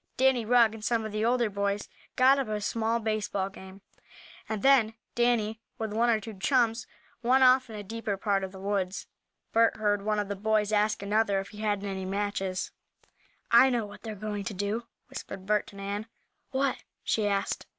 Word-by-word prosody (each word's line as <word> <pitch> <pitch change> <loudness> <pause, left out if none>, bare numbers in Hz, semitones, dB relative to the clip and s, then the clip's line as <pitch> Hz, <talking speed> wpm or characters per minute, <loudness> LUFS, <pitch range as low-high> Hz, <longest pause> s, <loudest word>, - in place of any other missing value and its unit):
Danny 260 -3 +3
Rugg, 230 -1 +5
and 220 -1 -9
some 225 0 0
of 215 - -5
the 215 +1 -1
older 240 0 +2
boys, 200 0 -2 0.3
got 265 +2 +5
up 270 - -1
a 215 -1 -2
small 225 +2 0
baseball 215 -3 -1
game, 190 0 -12 0.7
and 215 -2 -3
then 245 -5 +5 0.2
Danny, 230 -2 +1 0.2
with 220 -2 -3
one 235 +2 +2
or 225 -2 +3
two 215 -2 -9
chums, 235 0 +2 0.3
went 255 +2 +4
off 255 -1 +5
in 220 - -8
a 205 - -6
deeper 220 -1 -3
part 195 -1 0
of 190 - -4
the 190 - -11
woods. 195 -1 -2 0.5
Bert 230 0 +4
heard 205 -2 +1
one 210 +1 0
of 205 -1 -1
the 200 - -3
boys 210 +1 +1
ask 210 -1 +1
another 205 -1 +2
if 195 - -6
he 210 - -12
had 205 -2 -1
any 190 -2 -4
matches. 195 -1 -2 0.8
"I 235 +3 +7
know 240 -4 0
what 205 0 -12
they're 220 -2 -6
going 205 0 -4
to 205 - -4
do," 205 +4 -2 0.2
whispered 190 -1 -8
Bert 210 +1 +1
to - - -13
Nan. 200 +2 -4 0.4
"What?" 270 0 0 0.3
she 215 -2 +1
asked. 200 -1 -1
215 Hz, 195 wpm, -28 LUFS, 200-230 Hz, 0.8 s, I